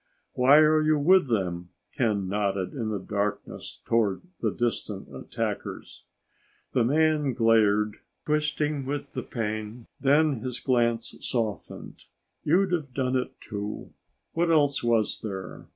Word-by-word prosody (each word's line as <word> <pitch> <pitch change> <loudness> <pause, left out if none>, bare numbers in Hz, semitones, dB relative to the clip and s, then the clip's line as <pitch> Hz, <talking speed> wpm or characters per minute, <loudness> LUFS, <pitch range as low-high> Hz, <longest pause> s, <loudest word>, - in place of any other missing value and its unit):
"Why 130 +4 +6
are 155 0 +5
you 155 0 +3
with 175 +3 +5
them?" 90 -6 -1 0.3
Ken 105 -6 0
nodded 100 -1 -1
in 115 -6 -3
the 105 - -1
darkness 100 +2 -4
toward 110 -5 +1 0.2
the - - +1
distant 105 - -3
attackers. - - -5 0.7
The 125 - +2
man 150 +1 +2
glared, 105 -3 +3 0.3
twisting 150 -1 0
with 145 0 -4
the - - -4
pain. 110 0 -4
Then 145 -1 +3
his 125 +1 -4
glance 120 -3 +1
softened. 110 -7 -4 0.4
"You'd 185 +5 +3
have 150 -8 -2
done 130 -1 0
it, 125 - -2
too. 105 -1 -6 0.4
What 170 +1 +1
else 145 -4 +3
was 115 -3 +1
there? 95 -4 -7
120 Hz, 130 wpm, -27 LUFS, 105-145 Hz, 0.7 s, Why